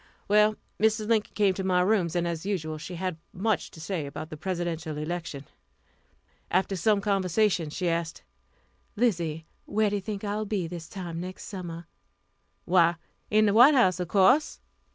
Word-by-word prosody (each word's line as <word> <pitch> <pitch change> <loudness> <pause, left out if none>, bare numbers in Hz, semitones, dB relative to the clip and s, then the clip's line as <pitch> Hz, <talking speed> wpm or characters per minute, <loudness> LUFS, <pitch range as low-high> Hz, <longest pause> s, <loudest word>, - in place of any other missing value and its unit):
Well, 210 +1 +4 0.3
Mrs. 220 0 +2
Lincoln 220 -2 +1
came 200 -3 +3
to 190 - -4
my 180 -1 +2
rooms, 185 -3 +1
and, 175 0 +1
as 165 -2 -3
usual, 160 -6 -3
she 170 +3 -7
had 180 -2 -3
much 200 -1 -1
to - - -14
say 165 -3 -3
about 155 +3 -7
the - - -5
Presidential 170 -2 -3
election. 155 -3 -5 1.0
After 190 +2 +1
some 200 +3 +2
conversation, 195 -3 +1
she 180 +4 -3
asked: 165 -1 -2 0.7
"Lizzie, 170 -9 0 0.2
where 210 0 +1
do 205 - 0
you - - -4
think 205 +1 -5
I 205 0 -2
will 215 - -2
be 195 -4 -1
this 170 0 -7
time 175 -4 -6
next 185 +1 -7
summer?" 175 -4 -7 0.8
"Why, 175 -1 +4 0.3
in 215 0 +4
the 205 - +3
White 250 +7 +8
House, 185 -8 +4
of 180 - -2
course." 215 - +3
185 Hz, 175 wpm, -27 LUFS, 170-210 Hz, 1.0 s, White